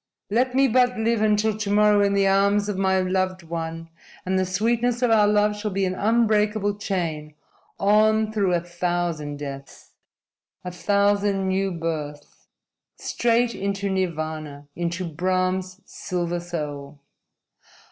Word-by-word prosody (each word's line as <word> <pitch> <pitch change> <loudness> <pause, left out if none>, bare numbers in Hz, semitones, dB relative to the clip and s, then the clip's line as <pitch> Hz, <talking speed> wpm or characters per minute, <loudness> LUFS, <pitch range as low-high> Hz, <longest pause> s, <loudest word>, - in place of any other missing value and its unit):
"Let 250 +3 +1
me 270 0 +4
but 250 0 +2
live 225 0 +1
until 215 0 +2
to 210 -1 -4
morrow 210 0 +4
in 200 0 +2
the 200 0 +3
arms 200 +1 +2
of 205 - -2
my 190 0 +2
loved 185 0 -1
one, 165 0 -5 0.4
and 185 0 +1
the 185 - 0
sweetness 235 +5 0
of 245 - +3
our 210 -2 +5
love 210 0 +2
shall 210 +1 -3
be 195 0 -1
an 185 - -1
unbreakable 210 -1 +1
chain 160 -7 -3 0.4
on 215 +2 +3
through 200 -4 +1
a 170 - 0
thousand 175 -4 -3
deaths, 140 -1 -9 0.7
a 180 - -4
thousand 200 +2 +1
new 190 +1 0
births, 160 -4 -6 0.5
straight 235 0 0
into 200 0 -2
Nirvana 155 -5 -3
into 175 +1 -3
Brahm's 185 +3 -1
silver 175 -1 -3
soul!" 150 -4 -6
190 Hz, 135 wpm, -23 LUFS, 175-210 Hz, 0.7 s, our